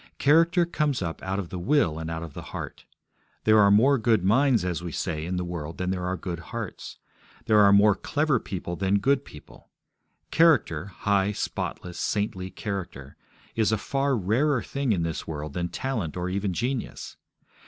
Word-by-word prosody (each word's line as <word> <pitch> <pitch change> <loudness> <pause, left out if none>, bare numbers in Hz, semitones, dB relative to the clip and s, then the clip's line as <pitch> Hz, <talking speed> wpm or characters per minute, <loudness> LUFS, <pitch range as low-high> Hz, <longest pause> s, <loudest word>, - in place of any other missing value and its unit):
Character 165 +4 +4
comes 150 - -1
up 80 -2 -4
out 95 0 -2
of 95 -4 -4
the 90 - -5
will 90 - +2
and 80 0 -5
out 80 0 -4
of 80 -4 -8
the - - -7
heart. - - -8 0.6
There 110 0 +5
are 100 -1 +6
more 125 +7 +5
good 110 -4 +2
minds, 120 +2 +3
as 90 -2 -2
we 85 -1 -5
say, 80 -1 -3
in 90 - -2
the 90 0 -2
world 85 -2 -6
than 90 0 -1
there 90 -1 -2
are 90 0 -2
good 90 -4 -5
hearts. 85 - -7 0.5
There 110 -1 +4
are 100 -1 +7
more 100 +1 +6
clever 145 +6 0
people 85 -4 -5
than 95 +2 +1
good 135 +6 +2
people; 75 - -15 0.6
character, 120 - +3
high, 100 +2 0
spotless, 90 -3 -4
saintly 95 -3 -2
character, 90 -11 -6 0.4
is 110 -1 +2
a 110 - +2
far 135 +4 0
rarer 120 +7 +1
thing 140 -3 -2
in 90 -5 +1
this 80 -1 -4
world 75 -2 -5
than 85 +2 -2
talent 110 - -3
or 90 +1 -2
even 100 +1 -1
genius. 125 +6 -3
100 Hz, 185 wpm, -26 LUFS, 85-125 Hz, 0.6 s, are